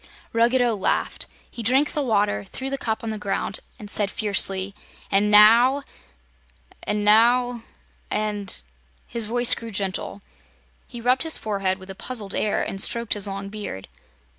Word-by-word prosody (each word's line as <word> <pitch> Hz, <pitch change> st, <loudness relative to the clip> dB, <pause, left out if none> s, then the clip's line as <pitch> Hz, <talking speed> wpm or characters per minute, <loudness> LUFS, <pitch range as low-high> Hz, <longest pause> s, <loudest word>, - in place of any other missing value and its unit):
Ruggedo 240 Hz, +1 st, +3 dB
laughed. 195 Hz, -, -1 dB, 0.2 s
He 235 Hz, -, -7 dB
drank 265 Hz, +6 st, +3 dB
the 300 Hz, -, -1 dB
water, 205 Hz, -, +1 dB
threw 265 Hz, -, -5 dB
the 275 Hz, -, -1 dB
cup 220 Hz, -1 st, -2 dB
on 225 Hz, -, -3 dB
the 215 Hz, -, -5 dB
ground 195 Hz, -1 st, -2 dB, 0.2 s
and 210 Hz, -, -10 dB
said 205 Hz, -1 st, 0 dB
fiercely: 195 Hz, -2 st, 0 dB, 0.4 s
"And 200 Hz, +2 st, +3 dB
now 230 Hz, +7 st, +6 dB, 1.0 s
and 210 Hz, 0 st, -2 dB
now 240 Hz, +3 st, +4 dB, 0.5 s
and 205 Hz, -, -1 dB, 0.2 s
" 60 Hz, 0 st, -37 dB
His 230 Hz, -2 st, -1 dB
voice 240 Hz, +1 st, +4 dB
grew 230 Hz, -, -5 dB
gentle. 200 Hz, 0 st, -4 dB, 0.6 s
He 240 Hz, -2 st, -9 dB
rubbed 250 Hz, +2 st, +2 dB
his 320 Hz, -1 st, +2 dB
forehead 195 Hz, -3 st, -1 dB
with 190 Hz, 0 st, -9 dB
a -, -, -6 dB
puzzled 210 Hz, -1 st, -2 dB
air 210 Hz, -, 0 dB
and 195 Hz, -, -3 dB
stroked 235 Hz, +1 st, +1 dB
his 205 Hz, -1 st, 0 dB
long 195 Hz, 0 st, -5 dB
beard. 200 Hz, -, -7 dB
210 Hz, 160 wpm, -23 LUFS, 200-240 Hz, 1.0 s, now